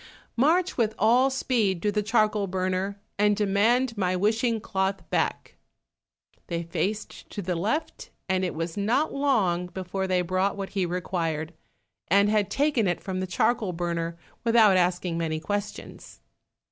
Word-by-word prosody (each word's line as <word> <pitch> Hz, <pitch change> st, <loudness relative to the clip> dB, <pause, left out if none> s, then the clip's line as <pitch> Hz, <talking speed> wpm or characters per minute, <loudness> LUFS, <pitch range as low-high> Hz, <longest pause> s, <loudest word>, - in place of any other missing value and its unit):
"March 335 Hz, +9 st, +2 dB
with 220 Hz, -3 st, +1 dB
all 245 Hz, +5 st, +4 dB
speed 235 Hz, -8 st, 0 dB
to 210 Hz, -, +2 dB
the 210 Hz, +1 st, 0 dB
charcoal 210 Hz, -1 st, +1 dB
burner, 185 Hz, +2 st, -2 dB, 0.2 s
and 210 Hz, 0 st, +3 dB
demand 225 Hz, +5 st, +2 dB
my 185 Hz, -3 st, 0 dB
wishing 225 Hz, +4 st, +1 dB
cloth 195 Hz, -1 st, -2 dB
back." -, -, -1 dB, 0.9 s
They 170 Hz, -1 st, -2 dB
faced 200 Hz, +5 st, -4 dB
to -, -, -7 dB
the 180 Hz, 0 st, -1 dB
left, 215 Hz, -, -2 dB, 0.2 s
and 190 Hz, 0 st, +1 dB
it 180 Hz, -, -2 dB
was 165 Hz, +1 st, -3 dB
not 235 Hz, +10 st, +1 dB
long 210 Hz, -11 st, +1 dB
before 190 Hz, +1 st, -4 dB
they 180 Hz, -1 st, +1 dB
brought 185 Hz, +3 st, 0 dB
what 195 Hz, -1 st, -4 dB
he 190 Hz, -3 st, -1 dB
required, 165 Hz, -3 st, -2 dB, 0.5 s
and 200 Hz, +3 st, +4 dB
had 210 Hz, -2 st, +2 dB
taken 280 Hz, -7 st, +1 dB
it 175 Hz, -, 0 dB
from 190 Hz, -2 st, -4 dB
the 185 Hz, -, -2 dB
charcoal 205 Hz, +1 st, +1 dB
burner 170 Hz, -1 st, -3 dB, 0.3 s
without 225 Hz, -4 st, +5 dB
asking 175 Hz, -1 st, +1 dB
many 160 Hz, -1 st, -1 dB
questions. 205 Hz, +4 st, -5 dB
195 Hz, 150 wpm, -26 LUFS, 180-220 Hz, 0.9 s, without